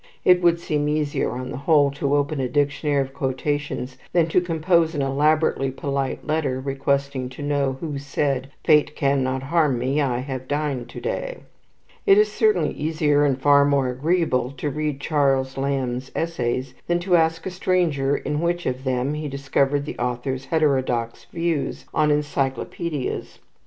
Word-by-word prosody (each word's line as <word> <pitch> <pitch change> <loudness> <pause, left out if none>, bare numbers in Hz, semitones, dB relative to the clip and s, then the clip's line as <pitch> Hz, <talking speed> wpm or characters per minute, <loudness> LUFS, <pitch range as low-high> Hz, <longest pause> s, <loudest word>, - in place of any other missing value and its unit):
It 180 0 +6
would 170 -1 +3
seem 150 -3 -1
easier, 150 -1 0
on 130 +1 -5
the - - -5
whole, 145 -3 +5
to 140 0 0
open 145 0 0
a 130 -2 -1
dictionary 145 0 +1
of 135 0 -10
quotations 135 -1 -3
than 170 -2 +4
to 180 - +3
compose 165 -1 +1
an 145 - 0
elaborately 145 0 +2
polite 135 0 -3
letter, 150 -4 0
requesting 135 -1 -1
to 130 +3 -8
know 140 -2 0
who 150 -4 -3
said 140 -1 -1
"Fate 150 -1 +4
cannot 135 -2 0
harm 150 -2 +2
me; 135 +5 0
I 130 -4 0
have 130 0 -5
dined 145 -4 -2
to - - -8
day." - - -4 0.7
It 395 0 +7
is 425 0 +4
certainly 430 -1 +2
easier, 150 -1 +1
and 135 -3 +1
far 140 +1 +5
more 140 -2 +2
agreeable, 130 -2 +1
to 145 +3 -2
read 150 -1 -2
Charles 135 -3 +1
Lamb's 135 -2 -2
essays 130 -5 -2
than 175 - +2
to 180 0 +2
ask 165 0 +2
a 190 - -3
stranger 165 -7 +1
in 150 +2 -2
which 175 +1 -1
one 130 - +1
of 130 +1 -14
them 130 +1 0
he 150 0 -4
discovered 140 0 0
the - - -7
author's 125 +2 -2
heterodox 130 -7 0
views 165 -4 -2
on 150 -1 +3
encyclopaedias. 145 +1 -2
145 Hz, 165 wpm, -23 LUFS, 135-155 Hz, 0.7 s, It